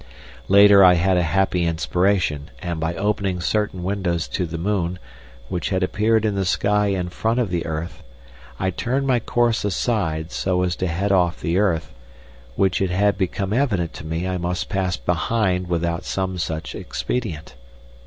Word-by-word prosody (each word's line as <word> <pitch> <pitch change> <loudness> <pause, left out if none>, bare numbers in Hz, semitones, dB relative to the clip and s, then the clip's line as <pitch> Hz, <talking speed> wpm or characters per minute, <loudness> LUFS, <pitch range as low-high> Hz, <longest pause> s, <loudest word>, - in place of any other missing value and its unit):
Later 100 0 +7
I 90 -1 +7
had 90 +2 +2
a 90 - +3
happy 90 +2 +1
inspiration, 85 -2 0
and 85 -3 -4
by 80 +1 -2
opening 100 -2 -1
certain 100 0 -1
windows 90 -3 -1
to 90 - -2
the 80 +1 -5
moon, 90 -1 -1 0.5
which 90 - -3
had 95 -1 0
appeared 110 +3 +1
in 105 - +1
the 100 -1 0
sky 105 +3 +1
in 95 -3 -1
front 115 +6 -1
of 115 -7 0
the 85 -2 -2
earth, 80 +2 -5 0.6
I 95 - 0
turned 130 +9 -1
my 130 -3 +2
course 120 0 +1
aside 90 -6 -1
so 90 -1 0
as 90 0 0
to 95 - -1
head 95 +4 -1
off 90 -2 +2
the 85 +3 0
earth, 85 -10 0 0.6
which 95 +4 +1
it 95 - +1
had 100 +3 +2
become 95 +1 -2
evident 105 - 0
to - - -9
me 80 +3 -3
I 90 -1 -2
must 90 +1 -3
pass 95 -2 -1
behind 90 - 0
without 85 0 -1
some 95 -1 -2
such 80 -1 -3
expedient. 95 -11 -4
95 Hz, 175 wpm, -22 LUFS, 85-100 Hz, 0.6 s, Later